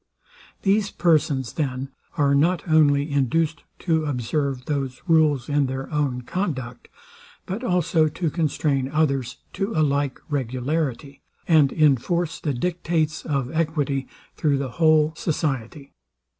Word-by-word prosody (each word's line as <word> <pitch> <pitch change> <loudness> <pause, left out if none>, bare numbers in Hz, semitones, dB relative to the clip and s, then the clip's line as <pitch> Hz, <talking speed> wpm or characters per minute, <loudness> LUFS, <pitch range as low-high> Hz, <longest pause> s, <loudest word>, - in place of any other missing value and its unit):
These 200 +1 +2
persons, 150 -7 +1
then, 135 -3 -2 0.3
are 140 -1 +3
not 170 +6 +2
only 145 -2 +3
induced 150 +4 +1 0.2
to 160 -3 +1
observe 135 0 -2
those 135 -3 -2
rules 155 -6 +3
in 145 -1 +1
their 135 +3 -5
own 135 -4 -1
conduct, 130 -8 -4 0.6
but 195 +7 -4
also 175 -6 +2
to 160 +1 -2
constrain 145 -4 0
others 140 -4 0 0.2
to 195 +3 -2
a 155 - +3
like 140 -1 -1
regularity, 140 +1 -2 0.3
and 155 -5 +5
inforce 155 +3 +1
the 145 -4 -2
dictates 165 0 -1
of 140 -4 -1
equity 150 -5 -1 0.3
through 145 -3 +1
the 135 -1 -3
whole 155 -1 +4
society. 140 -4 -3
150 Hz, 125 wpm, -23 LUFS, 135-160 Hz, 0.6 s, and